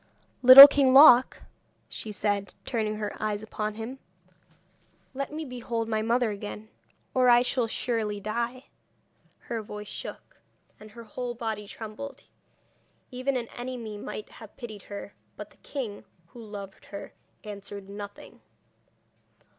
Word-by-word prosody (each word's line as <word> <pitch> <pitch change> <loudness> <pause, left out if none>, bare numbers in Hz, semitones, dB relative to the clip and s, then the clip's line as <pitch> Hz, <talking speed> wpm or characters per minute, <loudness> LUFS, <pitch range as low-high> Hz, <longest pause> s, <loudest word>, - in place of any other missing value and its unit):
'Little 260 +2 +13
King 275 -2 +2
Loc,' 265 -3 +7 0.4
she 220 - -6
said, 205 -1 -2
turning 215 -3 -2
her 210 -1 -5
eyes 210 -1 -2
upon 215 -1 -4
him, 230 +5 -7 1.1
'let 275 +2 -4
me 310 +1 -5
behold 240 -3 -4
my 220 -1 -1
mother 235 +1 +1
again, 210 +1 -8 0.4
or 255 -1 +4
I 240 0 +6
shall 250 -2 -1
surely 220 -3 -2
die.' 235 +5 -4 0.8
Her 230 -2 -5
voice 210 0 -9
shook, - - -8 0.4
and 215 - -13
her 230 +2 -12
whole 240 +2 -6
body 220 -3 -5
trembled. 220 +7 -9 0.9
Even 255 +1 -2
an 235 -2 -4
enemy 245 -3 -7
might 210 +1 -7
have 220 -2 -14
pitied 215 -5 -9
her; 200 0 -9 0.2
but - - -9
the - - -23
king, 235 -8 -6 0.3
who 235 +4 -12
loved 200 -2 -10
her, 200 - -9 0.3
answered 200 -1 -9
nothing. 205 0 -10
225 Hz, 135 wpm, -27 LUFS, 210-250 Hz, 1.1 s, Little